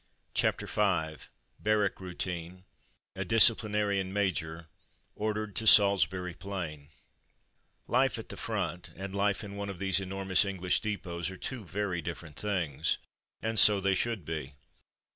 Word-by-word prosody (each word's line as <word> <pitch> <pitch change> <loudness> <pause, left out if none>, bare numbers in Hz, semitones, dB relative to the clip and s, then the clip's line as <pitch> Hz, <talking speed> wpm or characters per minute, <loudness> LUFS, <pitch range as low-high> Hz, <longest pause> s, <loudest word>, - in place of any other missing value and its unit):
CHAPTER - - +1
V 85 -7 0 0.3
BARRACK 105 -2 +1
ROUTINE 90 -1 -5 0.3
— - - -34
^A - - -4
DISCIPLINARIAN 105 -4 +3
MAJOR 85 -5 -1 0.3
— - - -35
ORDERED 110 -1 -2
TO 110 - 0
SALISBURY 95 -3 +5
PLAIN 85 -6 -6 1.0
Life - - +2
at - - -8
the - - -6
front 90 +1 -3
and 95 +1 -6
life 100 +1 +1
in 100 -1 -7
one 100 0 -4
of 100 - -6
these 95 0 +2
enormous 95 0 +2
English 95 -3 0
depots 90 -5 -3
are 95 - -8
two 125 +4 -5
very 95 0 -2
differ 85 0 -6
ent 75 -2 -13
things. 85 -8 -1 0.5
And 110 -1 0
so 105 +1 +7
they 95 0 +2
should 105 -2 -1
be. 75 -4 -5
95 Hz, 145 wpm, -30 LUFS, 85-105 Hz, 1.0 s, so